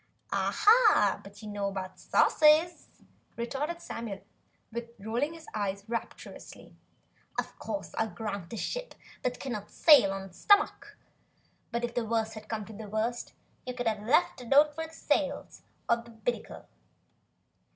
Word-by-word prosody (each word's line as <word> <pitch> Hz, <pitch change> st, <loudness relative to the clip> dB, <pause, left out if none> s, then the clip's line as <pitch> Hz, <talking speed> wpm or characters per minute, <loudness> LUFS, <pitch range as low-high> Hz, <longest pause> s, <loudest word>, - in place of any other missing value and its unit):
"Ah 435 Hz, 0 st, +4 dB
but -, -, -10 dB
what 205 Hz, -, -14 dB
you -, -, -7 dB
know 205 Hz, -1 st, -2 dB
about 190 Hz, -1 st, -5 dB
sauces!" 315 Hz, +3 st, +4 dB, 0.5 s
retorted 285 Hz, +8 st, -3 dB
Samuel, 215 Hz, -4 st, -6 dB, 0.8 s
rolling 235 Hz, +9 st, -2 dB
his 325 Hz, -1 st, -12 dB
eyes 200 Hz, -1 st, -2 dB
rapturously. 230 Hz, 0 st, -7 dB, 0.6 s
"Of -, -, -4 dB
course, 300 Hz, -, -5 dB
I'll 220 Hz, -, 0 dB
grant 200 Hz, -5 st, -5 dB
a 230 Hz, -, -5 dB
ship -, -, -4 dB, 0.3 s
cannot 245 Hz, -4 st, -3 dB
sail 285 Hz, -12 st, +6 dB
on 195 Hz, 0 st, -4 dB
its 190 Hz, -2 st, -13 dB
stomach, 410 Hz, 0 st, +3 dB, 0.7 s
but 235 Hz, 0 st, -2 dB
if 240 Hz, 0 st, -2 dB
the 240 Hz, -, 0 dB
worst 220 Hz, 0 st, -1 dB
had 215 Hz, -1 st, -10 dB
come 215 Hz, -2 st, -3 dB
to 220 Hz, -, -11 dB
the 215 Hz, 0 st, -8 dB
worst, 225 Hz, +3 st, -2 dB, 0.3 s
you 250 Hz, -, -4 dB
could 245 Hz, -, -3 dB
have 215 Hz, -2 st, 0 dB
left 260 Hz, +5 st, +2 dB
a 245 Hz, -, -10 dB
note 295 Hz, +4 st, +5 dB
for 320 Hz, +1 st, -4 dB
the -, -, -16 dB
sails -, -, -1 dB, 0.3 s
on 235 Hz, 0 st, +2 dB
the -, -, -14 dB
binnacle. 230 Hz, +1 st, -4 dB
230 Hz, 150 wpm, -30 LUFS, 210-295 Hz, 0.8 s, sail